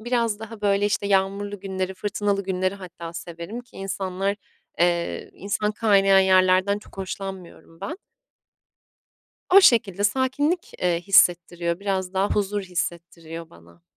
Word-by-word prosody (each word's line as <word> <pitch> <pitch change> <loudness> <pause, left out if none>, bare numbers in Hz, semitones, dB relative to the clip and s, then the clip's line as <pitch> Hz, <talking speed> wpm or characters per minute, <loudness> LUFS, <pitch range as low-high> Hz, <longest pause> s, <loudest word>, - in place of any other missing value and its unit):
biraz 230 -2 0
daha, 225 0 -9
böyle, 200 0 +2
işte, 205 0 -1
yağmurlu 200 +1 0
günleri, 190 -1 -3
fırtınalı 200 0 -1
günleri 185 0 -1
hatta 175 -3 -9
severim 170 +6 -7
ki 245 - -19
insanlar, 195 0 -2 0.4
eee, 170 0 0
insan 210 +2 -2
kaynayan 195 -3 +4
yerlerden 185 +1 +4
çok 210 - -17
hoşlanmıyorum 190 -3 -7
ben. 320 - -5 1.6
O 395 - +11
şekilde 215 - +4
sakinlik, 265 - 0
eee, 175 -2 +2
hissettiriyor, 175 -2 +3
biraz 190 -2 -2
daha 195 +2 +2
huzur 205 0 0
hissettiriyor 170 -2 -5
bana. 85 0 -19
195 Hz, 125 wpm, -24 LUFS, 180-205 Hz, 1.6 s, O